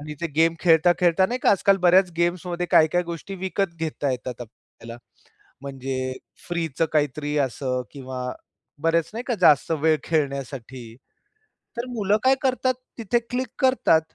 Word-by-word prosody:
आणि 150 +1 -7
ते 170 - -1
गेम 165 +1 +4
खेळता-खेळता 175 +2 +4
नाही 245 +5 -3
का, - - +5
आजकाल 195 0 +4
बऱ्याच 180 +1 +4
गेम्समध्ये 175 +1 -1
काय-काय 160 +3 +4
गोष्टी 170 +4 -7
विकत 190 0 -2
घेता 155 -3 -2
येतात 125 -1 -5
आपल्याला. 115 0 -12 0.7
म्हणजे 130 -1 -4 0.4
फ्रीचं 165 -3 -1
काहीतरी 150 0 0
असं 130 -1 -1
किंवा 130 -2 -6 0.5
बरेच 165 0 +1
नाही 230 +2 -4
का 245 - 0
जास्त 150 -4 +5
वेळ 160 +1 +3
खेळण्यासाठी, 135 -6 -3 0.8
तर 235 - -2
मुलं 210 -4 +1
काय 260 +1 +5
करतात 255 -1 +1 0.2
तिथे 235 +1 0
क्लिक 255 +1 -2
करतात. 260 - +3
165 Hz, 140 wpm, -24 LUFS, 135-190 Hz, 0.8 s, का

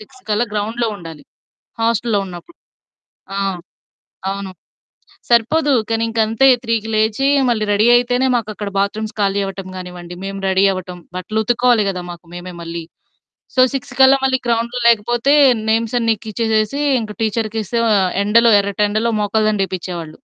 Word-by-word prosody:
6 235 +5 -16
కల్లా 215 +3 +1
గ్రౌండ్‌లో 225 +3 -1
ఉండాలి. 165 -5 -10 0.6
హాస్టల్‌లో 225 -2 +1
ఉన్నప్పుడు. 180 - -11 0.8
ఆ! - - -2 0.9
అవును. 195 0 -5 0.8
సరిపోదు. 265 +6 +3 0.2
కానీ 225 0 0
ఇంకంతే 225 +3 +2 0.2
3కి 225 -2 -1
లేచి 220 +5 +1 0.2
మళ్ళీ 225 -3 0
రెడీ 210 +3 +3
అయితేనే 245 +2 +2
మాకక్కడ 215 -3 -3
బాత్‌రూమ్స్ 215 +2 -2
ఖాళీ 200 0 +1
అవ్వటం 195 -1 -7
గానివ్వండి, 180 -1 -8
మేము 195 0 -5
రెడీ 190 +1 +2
అవ్వటం. 185 -1 -7 0.2
బట్టలు 200 +4 -3
ఉతుక్కోవాలి 240 -1 +3
కదా! 185 -2 -4
మాకు 175 0 -12
మేమే 180 +1 -8
మళ్ళీ. 170 0 -6 0.7
సో, 255 - +3
6 270 - -5
కల్లా 265 +1 +7
మళ్ళీ 260 -1 +2
గ్రౌండ్‌లో 235 +1 -1
లేకపోతే, 240 +5 +2 0.4
నేమ్స్ 225 +1 0
అన్నీ 230 -1 +2
ఎక్కిచ్చేసేసి 220 +3 -1 0.2
ఇంక 215 -2 -6
టీచర్‌కిస్తే 220 0 -2
ఆ - - +4 0.3
ఎండలో 230 +3 +4
ఎర్రటెండలో 210 +3 0
మోకాలు 215 +1 +1
దండ 210 -2 0
ఏపిచ్చేవాళ్ళు. 175 -3 -5
215 Hz, 140 wpm, -18 LUFS, 195-235 Hz, 0.9 s, కల్లా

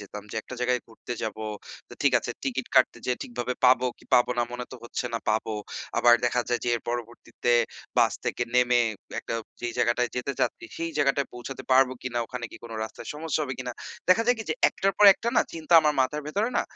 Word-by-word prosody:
যেতাম 105 0 -8
যে - - -6
একটা 125 - -9
জায়গায় 125 0 +1
ঘুরতে 115 +2 -8
যাব, 110 - -3 0.5
তো - - -14
ঠিক - - +4
আছে - - -5
টিকিট 130 -1 -2
কাটতে 130 -2 +4
যেয়ে 125 - 0
ঠিকভাবে 120 +1 -3
পাবো 125 0 +5
কি - - -19
পাবো 120 - +4
না 120 - +4
মনে 125 0 -4
তো - - -7
হচ্ছে 120 - -4
না 115 - +1
পাবো। 110 0 0 0.4
আবার 120 0 +7
দেখা 120 0 +2
যায় 120 - 0
যে 120 - 0
এর 115 - -9
পরবর্তীতে 120 0 -2 0.5
বাস - - +5
থেকে - - -1
নেমে 125 -1 +4 0.4
একটা - - -5 0.3
যেই 120 -1 -3
জায়গাটায় 120 0 +2
যেতে 130 +3 -2
চাচ্ছি 355 - -1
সেই 165 0 -3
জায়গাটায় 140 -1 +2
পৌঁছাতে 125 +2 -7
পারব 130 0 +6
কিনা, 125 -1 -2
ওখানে 125 0 -6
কি - - -10
কোন 115 - -8
রাস্তায় - - -9
সমস্যা 155 +1 -2
হবে 130 -3 -3
কিনা। 125 -1 -4 0.4
দেখা 220 +5 +6
যায় 245 0 +4
কি 220 - -5
যে - - +1
একটার 195 0 0
পর 210 - +6
একটা 235 - -3
না - - +6
চিন্তা 165 +1 -4
আমার 150 -1 +2
মাথার 145 +3 0
ভেতরে 210 +9 0
না - - +2
125 Hz, 220 wpm, -26 LUFS, 120-140 Hz, 0.5 s, আবার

